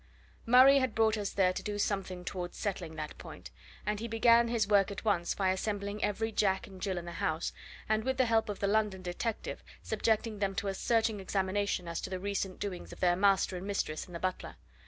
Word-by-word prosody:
Murray 260 +3 +8
had 260 -4 -1
brought 220 -1 +3
us 205 -2 -2
there 185 -2 +2
to - - -4
do 205 -1 -4
something 190 -3 -2
towards 175 -2 -5
settling 180 -6 -3
that 155 -1 -5
point, - - -10 0.3
and 210 0 -1
he 230 - -4
began 230 +1 +5
his 230 -3 +1
work 200 -2 +4
at 200 +2 -7
once 180 -5 +1
by 190 -2 +1
assembling 205 +1 -3
every 220 +2 0
Jack 190 -3 +1
and 190 -2 -13
Jill 190 -3 -1
in 175 - -5
the 175 - -6
house 160 0 -2 0.3
and, 220 0 +1
with 260 +2 -1
the 255 - +4
help 225 -2 +2
of 205 - -3
the - - +2
London 205 -2 +1
detective, 185 +5 -4 0.2
subjecting 220 -1 0
them 195 -1 -1
to 200 - -1
a - - -1
searching 225 +1 +1
examination 190 -1 -1
as 170 0 -3
to - - -5
the 185 - -3
recent 195 -1 -3
doings 195 -3 -5
of - - -11
their 175 -1 +3
master 195 -1 +3
and 185 +2 -6
mistress 155 -6 -2
and 175 - -10
the - - -4
butler. 185 +1 -3
200 Hz, 220 wpm, -31 LUFS, 185-220 Hz, 0.3 s, Murray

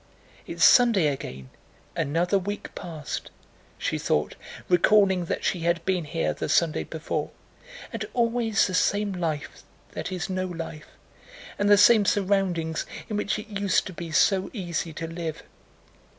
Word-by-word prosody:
"It's - - +2
Sunday 230 -9 +6
again—another 140 - -3
week 205 +2 -5
past," 160 -5 -6 0.5
she - - -2
thought, - - 0 0.3
recalling 190 0 +4
that - - -3
she 180 - +1
had 170 0 0
been 185 -3 0
here 165 +2 -1
the - - -4
Sunday 165 -3 +2
before, 160 0 -3 0.6
"and - - -3
always 230 -2 +2
the 185 - -3
same 205 +2 +1
life 165 -5 -3 0.3
that - - -5
is 180 -2 -3
no 185 0 -2
life, 165 -3 -7 0.7
and 205 0 +2
the 205 - +7
same 210 0 +6
surroundings 185 -5 0 0.2
in 215 - -2
which 210 0 -1
it 215 0 -8
used 200 -2 +1
to 190 - -7
be 170 0 -7
so 190 +3 +3
easy 175 -4 -3
to 165 - -5
live. 165 -1 -5
185 Hz, 145 wpm, -26 LUFS, 165-205 Hz, 0.7 s, the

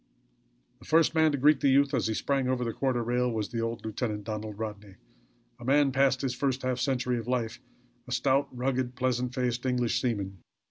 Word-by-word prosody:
The - - -16
first 160 0 +3
man 160 -1 +4
to 145 - -1
greet 145 +1 +4
the 140 - +3
youth 140 +1 +4
as 125 -4 +1
he 110 - -1
sprang 135 +1 0
over 130 -1 0
the 115 -1 -2
quarter 130 -3 0
rail, 125 +1 +1
was 110 -3 -2
the 115 - -3
old 115 0 -3
lieutenant, 110 -1 -3
Donald 105 0 -5
Rodney, 105 -3 -6 0.6
a - - -10
man 140 +2 +3
past 135 -1 +2
his 130 -2 0
first 130 0 -1
half 130 -1 -1
century 125 -1 0
of 115 - -7
life; 120 -3 -2 0.5
a - - -9
stout, 135 +3 +2
rugged, 125 0 -2
pleasant 125 0 -1
faced 125 -2 -1
English 125 -2 0
seaman. 100 -6 -2
125 Hz, 200 wpm, -28 LUFS, 115-135 Hz, 0.6 s, man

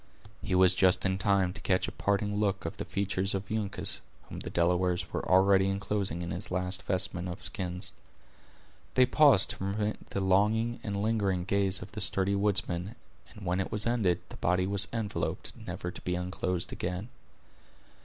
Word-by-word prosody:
He 95 - -1
was 90 0 +5
just 90 0 +4
in 95 0 0
time 95 -2 +2
to 100 - -10
catch 95 -1 +1
a - - -4
parting 100 0 -1
look 100 -4 0
of 80 - -5
the - - -5
features 100 0 -1
of 95 +1 -5
Uncas, 105 -4 -1 0.3
whom - - -7
the - - -6
Delawares 90 +1 +1
were - - -2
already 95 +1 +5
inclosing 95 -3 0
in 85 - -5
his 90 +5 -2
last 90 +1 -1
vestment 90 -1 -2
of 90 +3 -4
skins. 90 -2 +1 1.0
They 130 - +6
paused 135 -5 +5
to - - -7
permit 105 +2 -3
the - - -2
longing 105 +5 +2
and 100 -2 -3
lingering 100 -4 0
gaze 100 0 +2
of 95 - -12
the 105 - -6
sturdy 95 +1 +3
woodsman, 100 0 -1 0.3
and 105 -4 -12
when 90 +1 0
it 95 - -2
was 105 -1 -1
ended, 100 -8 +1
the - - -10
body 90 +1 +1
was 100 0 +1
enveloped, 110 -3 -2
never 90 - -4
to - - -10
be 90 - -2
unclosed 90 0 -3
again. 90 +5 -4
95 Hz, 180 wpm, -29 LUFS, 90-100 Hz, 1.0 s, They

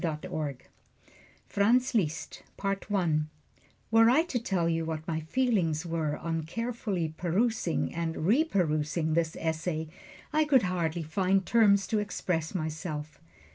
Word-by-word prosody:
[Illustration: 150 -3 -3 0.9
FRANZ 245 +6 +2
LISZT] 165 -8 -1 0.2
FRANZ 195 0 -2
LISZT 160 -5 +2 0.7
Were 225 0 +6
I 285 +7 +5
to 285 -8 -2
tell 190 -7 0
you 165 0 0
what 160 -1 -4
my 160 -2 -1
feelings 170 -4 0
were 160 -3 -1
on 165 0 -2
carefully 195 -3 -3
perusing 185 +2 0
and 165 -1 -2
reperusing 165 - +1
this 165 0 0
essay, 160 0 -2 0.4
I 310 0 +3
could 270 -6 +4
hardly 175 -3 -1
find 190 +4 +1
terms 200 -4 +4
to 215 +2 0
express 180 -5 -2
myself. 155 -2 -4
170 Hz, 130 wpm, -29 LUFS, 160-210 Hz, 0.9 s, Were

